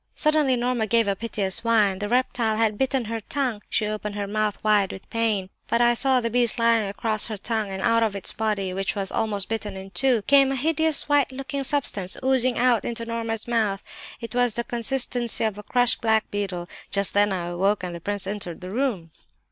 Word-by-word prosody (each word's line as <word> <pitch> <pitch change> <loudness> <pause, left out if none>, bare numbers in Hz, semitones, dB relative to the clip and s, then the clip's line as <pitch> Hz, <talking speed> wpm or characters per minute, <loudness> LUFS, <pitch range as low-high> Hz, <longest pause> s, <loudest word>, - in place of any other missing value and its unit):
Suddenly 305 -4 +3
Norma 240 -2 -1
gave 230 0 +2
a 200 - +1
piteous 200 -3 -2
whine; 210 -5 +2
the 205 0 -3
reptile 240 -3 +1
had 220 -2 +1
bitten 265 +1 0
her 225 +1 -3
tongue. 250 -2 -2
She 215 - +1
opened 210 -1 -4
her 205 -1 -2
mouth 210 0 -1
wide 210 -3 +3
with 190 - -9
the - - -28
pain, 215 -5 -1 0.2
and 235 +1 +3
I 240 0 +4
saw 260 +1 +3
the 230 -1 -2
beast 240 0 +2
lying 230 -2 +3
across 215 +2 -1
her 215 -2 -5
tongue, 215 0 -2
and 190 0 -4
out 230 0 +3
of 220 -3 0
its 195 - -1
body, 205 -4 -2
which 195 +2 -1
was 195 -1 -2
almost 205 -3 -1
bitten 210 -3 -4
in 190 0 -9
two, 240 +2 +2
came 275 +1 +5
a - - -1
hideous 315 +2 +3
white 290 -2 +2
looking 270 +1 -4
substance, 245 -10 -1
oozing 255 -2 +2
out 245 -2 +3
into 230 0 -4
Norma's 230 -1 -2
mouth; 215 -4 0 0.4
it 230 -1 -7
was 245 -2 +2
of - - -15
the 235 - -1
consistency 240 -1 0
of 215 -2 -1
a - - -9
crushed 245 +3 +2
black 220 -1 +1
beetle. 190 -4 -3 0.2
Just 200 -1 +1
then 205 0 +3
I 180 -2 -2
awoke 190 +3 0
and 180 -1 -4
the 170 - -8
prince 205 +1 -3
entered 195 -4 -5
the 180 +1 -7
room." 215 -9 -2
220 Hz, 220 wpm, -24 LUFS, 200-245 Hz, 0.4 s, came